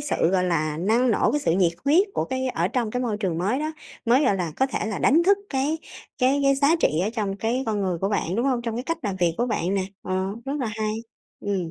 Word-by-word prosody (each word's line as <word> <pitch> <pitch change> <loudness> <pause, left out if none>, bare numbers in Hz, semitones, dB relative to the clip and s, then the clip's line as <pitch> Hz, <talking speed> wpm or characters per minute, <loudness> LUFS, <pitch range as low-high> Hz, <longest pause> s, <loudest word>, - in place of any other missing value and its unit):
sự, 290 - -2
gọi 185 -1 +2
là, 155 -3 0
năng 230 +7 +2
nổ, - - +2
cái 295 - +1
sự 165 - +1
nhiệt 175 -1 +3
huyết 340 +9 +4
của - - 0
cái 260 0 -2
ở - - 0
trong 240 -4 -1
cái 250 +3 -2
môi 220 -4 -1
trường 185 -6 -2
mới 205 +9 0
đó, 310 +1 -2 0.3
mới, 250 +5 +4
gọi 205 - +3
là, 175 -4 -2
có 265 - +3
thể 260 - -3
là 215 -3 -3
đánh 315 +6 +4
thức 395 +3 +4
cái 285 +4 0 0.4
cái 265 +2 +3
cái 275 0 +4
giá 285 +4 +3
trị 160 - +1
ở 210 - 0
trong 210 -4 -2
cái 230 +5 -1
con 210 -2 0
người 185 -3 -1
của 195 - 0
bạn, 195 -3 -1
đúng 240 +4 +1
hông, 255 -3 +1
trong 230 -1 -3
cái 245 - -2
cách 330 0 -2
làm 200 -3 -2
việc 170 -2 +1
của 240 - 0
bạn 195 -5 -1
nè? 195 - +1 0.2
Ờ, 185 0 -1 0.2
rất 275 - -3
là 245 - -1
hay. 215 0 -2 0.5
Ừm. 190 -5 -2
225 Hz, 270 wpm, -24 LUFS, 190-265 Hz, 0.5 s, huyết